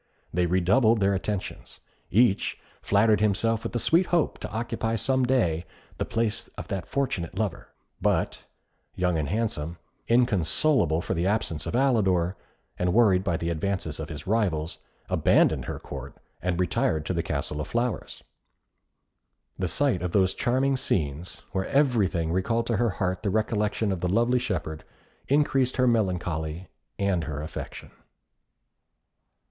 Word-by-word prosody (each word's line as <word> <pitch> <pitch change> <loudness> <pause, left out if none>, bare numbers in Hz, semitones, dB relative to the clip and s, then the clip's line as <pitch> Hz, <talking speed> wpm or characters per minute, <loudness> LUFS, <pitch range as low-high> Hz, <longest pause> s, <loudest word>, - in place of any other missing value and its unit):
They 90 0 +2
redoubled 100 +6 +3
their 100 0 +3
attentions. 100 0 -4 0.3
Each 110 0 +2 0.2
flattered 105 +1 +3
himself 110 +2 +1
with 115 - -3
the - - -1
sweet 170 +9 +3
hope 170 -3 +1
to - - -6
occupy 115 0 -2
some 130 +3 +1
day 90 -11 +1 0.4
the - - 0
place 115 -1 -1
of - - -7
that 95 -2 -3
fortunate 130 -12 -2
lover; 105 -6 -2 0.3
but - - 0 0.5
Young 90 -2 +1
and 75 - -2
Handsome, 85 -6 -2 0.3
inconsolable 115 - +2
for - - -2
the 85 +2 0
absence 85 -8 -1
of - - -2
Alidor, 100 -9 +2 0.4
and 90 +1 +1
worried 100 -6 +5
by 90 -4 0
the 85 +1 -2
advances 85 -2 -2
of 80 - -5
his 75 -1 -7
rivals, 95 -7 0 0.3
abandoned - - +3
her - - -4
Court, - - -8 0.3
and 90 -1 -1
retired 80 -3 +1
to 90 - -1
the 85 - 0
Castle 75 -2 -3
of - - -5
Flowers. 120 0 -2 1.4
The 90 - 0
sight 105 - +1
of 90 -1 -3
those 95 -2 +3
charming 130 +2 +1
scenes, 80 - -2
where 95 -1 -1
everything 105 - +2
recalled 115 +6 0
to 115 - 0
her 120 +2 +2
heart 95 -1 -2
the 105 - -1
recollection 105 0 0
of 95 - -2
the 90 - 0
lovely 120 +5 +3
shepherd, 80 -9 -3 0.4
increased 135 -3 +2
her 130 - +4
melancholy 90 -7 -1 0.3
and 95 -5 0
her 75 -1 -4
affection. 80 - -7
100 Hz, 150 wpm, -26 LUFS, 85-115 Hz, 1.4 s, worried